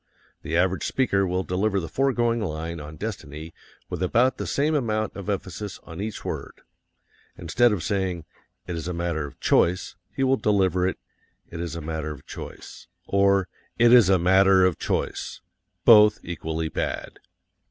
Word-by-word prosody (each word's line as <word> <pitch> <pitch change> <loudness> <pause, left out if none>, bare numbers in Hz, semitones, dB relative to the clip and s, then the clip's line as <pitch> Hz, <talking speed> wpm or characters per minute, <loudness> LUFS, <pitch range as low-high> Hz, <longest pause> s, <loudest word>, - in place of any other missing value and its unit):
The 80 0 -2
average 95 +1 +1
speaker 100 -7 +1
will 90 +1 -1
deliver 95 +3 0
the 85 - -5
foregoing 120 - +1
line 85 -2 -4
on 75 +1 -9
destiny 80 -6 -7 0.3
with 90 - -5
about 120 +7 +2
the - - -4
same 150 +3 +1
amount 110 -7 -1
of 100 0 -6
emphasis 100 +1 -4
on 80 +2 -8
each 110 0 -5
word. - - -6 0.8
Instead 115 +8 +2
of 100 -5 -2
saying, 95 -5 -2 0.4
"It 90 - -4
is 80 0 -5
a 90 - -3
matter 85 -3 -2
of 70 - -14
CHOICE," 90 +3 +1 0.2
he 135 - 0
will 135 0 +3
deliver 95 -4 +2
it, 95 - -2 0.5
"It 85 - -6
is 85 -1 -4
a 85 - -5
matter 80 0 -4
of 70 -3 -9
choice," - - -10 0.2
or 100 -1 +3 0.3
"IT 120 0 +6
IS 120 -6 +7
A 95 - +5
MATTER 95 +1 +5
OF 90 -3 0
CHOICE" - - -3 0.4
both 105 -2 +8
equally 80 -1 -3
bad. - - -4
95 Hz, 165 wpm, -25 LUFS, 85-105 Hz, 0.8 s, both